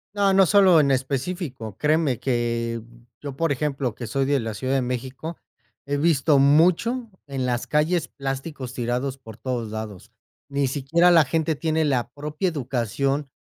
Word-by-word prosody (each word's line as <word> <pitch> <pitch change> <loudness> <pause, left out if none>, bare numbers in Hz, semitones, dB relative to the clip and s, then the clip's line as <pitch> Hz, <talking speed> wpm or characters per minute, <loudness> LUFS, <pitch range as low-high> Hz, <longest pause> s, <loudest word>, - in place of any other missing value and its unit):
No, 200 -1 +3
no 190 -2 +5
solo 190 -4 +6
en 145 -2 +3
específico, 135 - -2
créeme 150 -4 +1
que 115 -2 -1 0.4
yo, 140 -2 -6
por 165 -2 +1
ejemplo, 140 -4 -1
que 120 -1 -7
soy 135 -1 0
de 140 0 +2
la 110 -2 -4
ciudad 130 +3 -2
de 135 - +2
México 130 +6 -5 0.5
he 145 0 -1
visto 150 -2 +3
mucho 180 - +3 0.2
en 135 -2 -3
las 120 -1 -1
calles 155 +2 +1
plásticos 135 -1 -5
tirados 125 +3 -2
por 110 -3 -12
todos 120 -4 -3
lados. 110 -4 -7 0.4
Ni 140 0 0
siquiera 150 +6 +2
la 165 -3 +6
gente 160 +3 0
tiene 160 +1 0
la 125 -4 0
propia 150 +6 -2
educación 135 0 -1
140 Hz, 160 wpm, -24 LUFS, 125-160 Hz, 0.5 s, solo